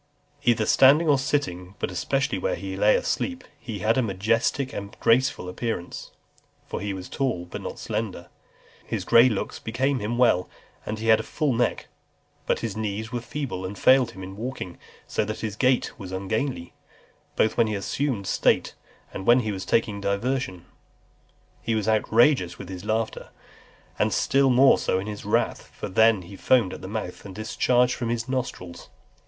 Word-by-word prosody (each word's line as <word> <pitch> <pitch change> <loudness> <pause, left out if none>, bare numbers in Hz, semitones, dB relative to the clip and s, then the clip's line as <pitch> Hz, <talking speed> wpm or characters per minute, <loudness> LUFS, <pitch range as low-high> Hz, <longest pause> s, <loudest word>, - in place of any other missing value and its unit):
XXX. 140 - -17
Either 115 -2 +4
standing 145 +8 +6
or 145 -3 +4
sitting, 100 -10 -2
but - - -3
especially 135 +9 -1
when - - -1
he - - -5
lay - - +4
asleep, 265 - -2 0.2
he 115 -4 -6
had 110 +5 +2
a - - +4
majestic 115 +5 0
and 100 +1 -7
graceful 120 -5 +2
appearance; 90 -1 -4 0.6
for - - -5
he 100 0 -2
was 95 -1 -6
tall, 125 -11 -2
but 90 - -7
not - - -6
slender. 105 -5 -4 0.6
His - - -4
grey 120 +2 +6
looks 105 -5 -3
became 130 +4 -1
him 115 +2 -2
well, 120 -7 +3 0.4
and 110 - -3
he 115 +1 -2
had 110 - +6
a - - -3
full 150 -5 -1
neck. 120 +1 0 0.6
But - - +1
his 115 -4 -3
knees 110 +1 -3
were 120 -1 -3
feeble, 120 -6 -5
and 95 +2 -5
failed 130 -1 +5
him 95 0 -9
in 95 +1 -8
walking, 110 -5 -6 0.3
so - - 0
that 110 +1 -5
his 110 -2 -3
gait 125 +2 +2
was 95 -3 -7
ungainly, 100 +1 -3 0.6
both 110 - +2
when 115 - +3
he 105 - -2
assumed 110 +1 -2
state, - - +1 0.4
and 95 - -6
when 120 +2 +6
he 110 -2 -2
was 95 -2 -5
taking 105 -3 0
diversion. 100 -2 -2 1.0
He 115 - -1
was 110 -1 -1
outrageous 110 - +3
in - - -9
his 95 -1 -7
laughter, 110 +1 -2 0.7
and - - +2
still 135 0 +3
more 130 +2 +6
so - - 0
in 95 - -3
his 105 -1 -7
wrath, - - 0
for - - -7
then 110 0 +4
he 90 +3 -11
foamed 115 -2 +2
at - - -8
the 95 - -7
mouth, 100 -3 -5
and 95 -2 -10
discharged 125 +3 +2
from 120 -2 -3
his 115 -1 -2
nostrils. 125 -9 -4
110 Hz, 180 wpm, -25 LUFS, 100-130 Hz, 1.0 s, standing